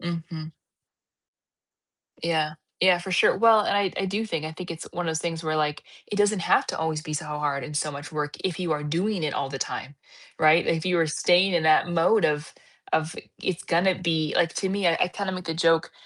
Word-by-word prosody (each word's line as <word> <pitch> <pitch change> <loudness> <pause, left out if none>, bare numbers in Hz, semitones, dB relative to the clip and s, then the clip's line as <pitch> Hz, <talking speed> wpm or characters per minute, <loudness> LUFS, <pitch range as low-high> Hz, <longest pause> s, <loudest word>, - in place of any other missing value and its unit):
Mhm. 165 -2 -5 1.7
Yeah. 160 -2 0 0.3
Yeah, 185 -1 +6
for 175 +2 -7
sure, 180 - +4
well, 225 -2 +5
and - - +1
I 200 -2 +1
I - - 0
do 205 +4 -2
think, 165 -7 -3
I 160 - -6
think 180 +1 -7
it's 165 - -8
one 175 0 -3
of - - -1
those 160 0 -1
things 165 0 -3
where, 155 0 -1
like, 150 -1 -1 0.3
it - - -3
doesn't 205 0 +2
have - - +3
to - - -3
always 160 -1 -1
be 155 - -7
so 155 +1 -3
hard 150 -2 -2
and 150 - -8
so 150 0 -1
much 145 +1 -8
work 150 -1 -4
if 180 -4 -2
you 180 -3 -2
are 150 -1 -1
doing 175 +4 -1
it 150 - -1
all 135 - -2
the 135 - -5
time, 140 +2 -5 0.4
right? 155 +2 +5
If 165 0 0
you 180 -1 +2
are 165 - +3
staying 175 +5 +3
in 165 - +1
that 155 +3 +4
mode 175 +5 +3
of 150 +1 0 0.4
of 160 +1 0 0.3
it's 185 -1 -2
gonna 180 +2 +2
be 160 -4 0
like, 170 -1 +2
to 190 - -1
me, 195 -1 +1
I 165 - +3
I - - +4
kind 200 +1 -4
of 185 - -3
make 180 -2 -7
a - - 0
joke, 165 0 +2
165 Hz, 235 wpm, -25 LUFS, 155-185 Hz, 1.7 s, Yeah